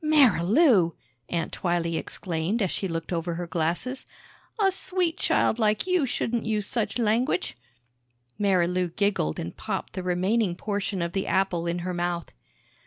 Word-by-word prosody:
"Marilou!" 235 Hz, -, +5 dB, 0.4 s
Aunt 170 Hz, -1 st, -2 dB
Twylee 170 Hz, -2 st, 0 dB
exclaimed 175 Hz, +6 st, -2 dB
as 190 Hz, -, 0 dB
she 195 Hz, -, -2 dB
looked 165 Hz, 0 st, -4 dB
over 170 Hz, 0 st, -2 dB
her 175 Hz, +1 st, -3 dB
glasses. 170 Hz, +10 st, -2 dB, 0.5 s
"A 390 Hz, -2 st, +4 dB
sweet 365 Hz, -2 st, 0 dB
child 225 Hz, -, +1 dB
like 215 Hz, -1 st, +2 dB
you 365 Hz, -6 st, +2 dB
shouldn't 235 Hz, 0 st, -1 dB
use 215 Hz, -2 st, 0 dB
such 230 Hz, +2 st, -2 dB
language!" 215 Hz, -, +1 dB, 0.8 s
Marilou 180 Hz, -3 st, +1 dB
giggled 200 Hz, -, +1 dB
and 85 Hz, -, -5 dB
popped -, -, -4 dB
the 185 Hz, -, -3 dB
remaining 185 Hz, +2 st, +1 dB
portion 200 Hz, -2 st, -2 dB
of 170 Hz, 0 st, -3 dB
the 195 Hz, -, -1 dB
apple 175 Hz, -2 st, +1 dB
in 170 Hz, +1 st, -1 dB
her 185 Hz, -, -2 dB
mouth. 175 Hz, -1 st, -2 dB
185 Hz, 150 wpm, -26 LUFS, 170-225 Hz, 0.8 s, Marilou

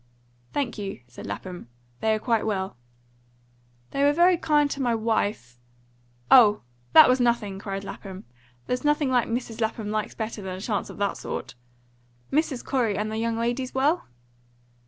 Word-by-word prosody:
"Thank 260 Hz, -6 st, -2 dB
you," 195 Hz, -10 st, -5 dB
said 120 Hz, -, -10 dB
Lapham, 180 Hz, -9 st, -6 dB, 0.3 s
"they're 220 Hz, 0 st, +2 dB
quite 225 Hz, 0 st, 0 dB
well." 190 Hz, -5 st, -2 dB, 1.2 s
"They 275 Hz, -, 0 dB
were 290 Hz, +1 st, +5 dB
very 350 Hz, +3 st, +5 dB
kind 295 Hz, -3 st, +2 dB
to 275 Hz, -, -3 dB
my 240 Hz, -3 st, +2 dB
wife 205 Hz, -, -1 dB, 0.4 s
" 120 Hz, 0 st, -27 dB
"Oh, 210 Hz, -2 st, +2 dB, 0.3 s
that -, -, +10 dB
was 255 Hz, +1 st, +3 dB
nothing!" 235 Hz, -5 st, +1 dB
cried 195 Hz, -1 st, -5 dB
Lapham. 195 Hz, -1 st, -8 dB, 0.4 s
"There's 250 Hz, 0 st, -2 dB
nothing 295 Hz, -1 st, +2 dB
Mrs. 240 Hz, -2 st, -1 dB
Lapham 220 Hz, -1 st, -2 dB
likes 215 Hz, -1 st, -2 dB
better 220 Hz, -1 st, -4 dB
than 185 Hz, -1 st, -5 dB
a -, -, -8 dB
chance 205 Hz, +1 st, -2 dB
of -, -, -10 dB
that 200 Hz, -1 st, -1 dB
sort. -, -, -5 dB, 0.8 s
Mrs. 285 Hz, -3 st, 0 dB
Corey 235 Hz, -7 st, 0 dB
and 215 Hz, +1 st, -2 dB
the 220 Hz, -, -3 dB
young 230 Hz, 0 st, -1 dB
ladies 240 Hz, +3 st, -2 dB
well?" 290 Hz, +6 st, +1 dB
225 Hz, 160 wpm, -25 LUFS, 200-255 Hz, 1.2 s, that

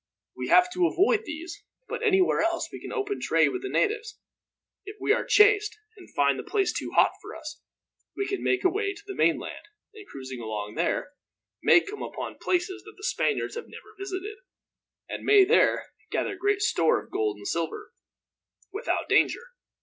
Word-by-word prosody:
We -, -, -4 dB
have 360 Hz, 0 st, +6 dB
to 360 Hz, -1 st, +3 dB
avoid 410 Hz, +5 st, +2 dB
these, 330 Hz, +2 st, -7 dB, 0.2 s
but -, -, -4 dB
anywhere 385 Hz, -5 st, +3 dB
else 335 Hz, 0 st, 0 dB
we -, -, -8 dB
can -, -, -7 dB
open 410 Hz, -3 st, -2 dB
trade -, -, +3 dB
with 375 Hz, -, -4 dB
the 390 Hz, -, -4 dB
natives. 435 Hz, +1 st, 0 dB, 0.7 s
If 410 Hz, +1 st, -9 dB
we 420 Hz, -, +3 dB
are -, -, 0 dB
chased, 420 Hz, 0 st, +4 dB, 0.2 s
and 380 Hz, -, -15 dB
find 140 Hz, -1 st, +3 dB
the -, -, -5 dB
place 395 Hz, -3 st, 0 dB
too -, -, -4 dB
hot -, -, +5 dB
for -, -, -9 dB
us, 310 Hz, -2 st, -9 dB, 0.6 s
we 400 Hz, -, 0 dB
can 395 Hz, -, -3 dB
make 380 Hz, -, +1 dB
away 400 Hz, +2 st, +1 dB
to 410 Hz, -, -14 dB
the 395 Hz, -, -6 dB
mainland -, -, 0 dB, 0.3 s
and, 420 Hz, -2 st, -13 dB
cruising 130 Hz, -2 st, -8 dB
along 105 Hz, -2 st, -5 dB
there, 175 Hz, -, -1 dB, 0.5 s
may 355 Hz, -, +6 dB
come 415 Hz, +3 st, -8 dB
upon -, -, -6 dB
places 370 Hz, +2 st, -1 dB
that 430 Hz, 0 st, -14 dB
the 405 Hz, -, -15 dB
Spaniards -, -, 0 dB
have 465 Hz, -, -6 dB
never 435 Hz, -, -13 dB
visited, 390 Hz, +1 st, -5 dB, 0.7 s
and -, -, -6 dB
may 410 Hz, -2 st, +6 dB
there 445 Hz, +4 st, +3 dB, 0.2 s
gather 405 Hz, -, -1 dB
great 405 Hz, +2 st, 0 dB
store 165 Hz, -, +3 dB
of -, -, -22 dB
gold 105 Hz, -1 st, -1 dB
and 100 Hz, -, -8 dB
silver, 165 Hz, -1 st, -3 dB, 0.8 s
without 430 Hz, +5 st, -2 dB
danger. 480 Hz, +1 st, +2 dB
390 Hz, 180 wpm, -27 LUFS, 330-420 Hz, 0.8 s, have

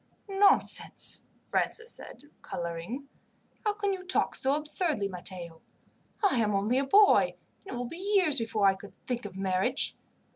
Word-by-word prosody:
"Nonsense!" 395 Hz, +1 st, +1 dB, 0.2 s
Francis 455 Hz, +1 st, -1 dB
said, -, -, -12 dB, 0.2 s
colouring. 170 Hz, +11 st, -5 dB, 0.6 s
"How 420 Hz, -2 st, +1 dB
can 405 Hz, -1 st, -1 dB
you 370 Hz, -1 st, -6 dB
talk 370 Hz, -, 0 dB
so 270 Hz, +2 st, +2 dB
absurdly, 300 Hz, -, +3 dB
Matteo? 175 Hz, -3 st, -6 dB, 0.7 s
I 260 Hz, -, +1 dB
am 210 Hz, -2 st, +1 dB
only 215 Hz, +6 st, +1 dB
a 275 Hz, -, 0 dB
boy, 405 Hz, +7 st, +5 dB, 0.3 s
and -, -, -6 dB
it -, -, -4 dB
will 245 Hz, -, -3 dB
be 375 Hz, +10 st, -3 dB
years 310 Hz, -8 st, +4 dB
before 225 Hz, -3 st, 0 dB
I 195 Hz, -, +6 dB
could 200 Hz, +1 st, -12 dB
think 245 Hz, -3 st, -3 dB
of 195 Hz, -2 st, -8 dB
marriage. 190 Hz, +6 st, 0 dB
250 Hz, 155 wpm, -29 LUFS, -, 0.7 s, I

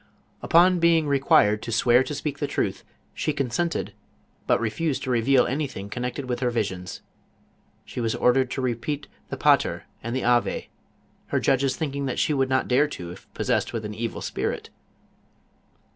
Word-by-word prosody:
Upon 180 Hz, +2 st, +5 dB
being 165 Hz, -2 st, +4 dB
required 135 Hz, -7 st, +3 dB
to 115 Hz, -, -5 dB
swear 120 Hz, +2 st, +4 dB
to 150 Hz, -, -4 dB
speak 145 Hz, 0 st, -4 dB
the 145 Hz, -, -1 dB
truth, -, -, -2 dB, 0.3 s
she 155 Hz, -, -1 dB
consented, 140 Hz, +5 st, -2 dB, 0.5 s
but -, -, +3 dB
refused 130 Hz, +6 st, -1 dB
to 130 Hz, -, -2 dB
reveal 125 Hz, +2 st, +4 dB
anything 130 Hz, -8 st, -3 dB
connect 125 Hz, +1 st, -3 dB
ed 140 Hz, -, -4 dB
with 125 Hz, -1 st, -2 dB
her 125 Hz, -1 st, +1 dB
visions. 95 Hz, -7 st, -3 dB, 0.8 s
She -, -, -5 dB
was 115 Hz, -1 st, 0 dB
ordered 130 Hz, +1 st, +3 dB
to 130 Hz, -, -3 dB
repeat 130 Hz, +4 st, -2 dB, 0.2 s
the -, -, -4 dB
Paler -, -, +3 dB, 0.2 s
and 115 Hz, +2 st, -4 dB
the 130 Hz, -, -1 dB
Ave, 120 Hz, 0 st, +1 dB, 0.6 s
her -, -, 0 dB
judges 135 Hz, 0 st, +2 dB
thinking 140 Hz, -3 st, -2 dB
she 155 Hz, -, +1 dB
would 135 Hz, -2 st, +1 dB
not 130 Hz, 0 st, +1 dB
dare 135 Hz, +4 st, +3 dB
to, 90 Hz, -12 st, -7 dB
if -, -, -14 dB
possessed -, -, 0 dB
with 110 Hz, -2 st, -3 dB
an 105 Hz, -, -5 dB
evil 115 Hz, +2 st, -4 dB
spirit. -, -, -3 dB
130 Hz, 170 wpm, -25 LUFS, 115-145 Hz, 0.8 s, Upon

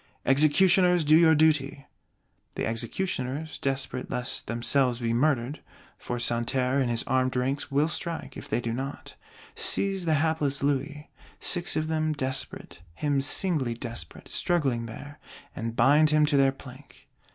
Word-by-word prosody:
"Executioners, 175 Hz, +5 st, +4 dB
do 155 Hz, +1 st, +5 dB
your 160 Hz, -1 st, +6 dB
duty!" 145 Hz, -3 st, +1 dB, 0.7 s
The -, -, -2 dB
Executioners, 135 Hz, +4 st, -3 dB
desperate 135 Hz, -2 st, -2 dB
lest 125 Hz, 0 st, -3 dB
themselves 120 Hz, +2 st, +1 dB
be 115 Hz, -1 st, -2 dB
murdered 130 Hz, +1 st, 0 dB, 0.4 s
(for 120 Hz, -, -4 dB
Santerre 125 Hz, +3 st, 0 dB
and 130 Hz, -3 st, 0 dB
his 120 Hz, 0 st, 0 dB
Armed 130 Hz, 0 st, 0 dB
Ranks 130 Hz, +3 st, -1 dB
will 145 Hz, +3 st, +2 dB
strike, 170 Hz, 0 st, -4 dB
if -, -, -9 dB
they -, -, 0 dB
do 115 Hz, -1 st, -3 dB
not), 135 Hz, +3 st, -6 dB, 0.4 s
seize 195 Hz, -2 st, +1 dB
the 160 Hz, -2 st, +2 dB
hapless 150 Hz, -2 st, 0 dB
Louis: 145 Hz, +2 st, -2 dB, 0.3 s
six 175 Hz, -1 st, +1 dB
of 155 Hz, 0 st, -1 dB
them 155 Hz, -1 st, 0 dB
desperate, 130 Hz, -8 st, -4 dB, 0.2 s
him 140 Hz, -, 0 dB
singly 140 Hz, -4 st, +1 dB
desperate, 115 Hz, -9 st, -7 dB
struggling 135 Hz, -9 st, 0 dB
there; 145 Hz, +6 st, -10 dB, 0.4 s
and 115 Hz, 0 st, -5 dB
bind 145 Hz, +6 st, +4 dB
him 155 Hz, 0 st, +3 dB
to 150 Hz, -1 st, +1 dB
their 135 Hz, -1 st, +4 dB
plank. 130 Hz, 0 st, -15 dB
140 Hz, 145 wpm, -27 LUFS, 125-155 Hz, 0.7 s, your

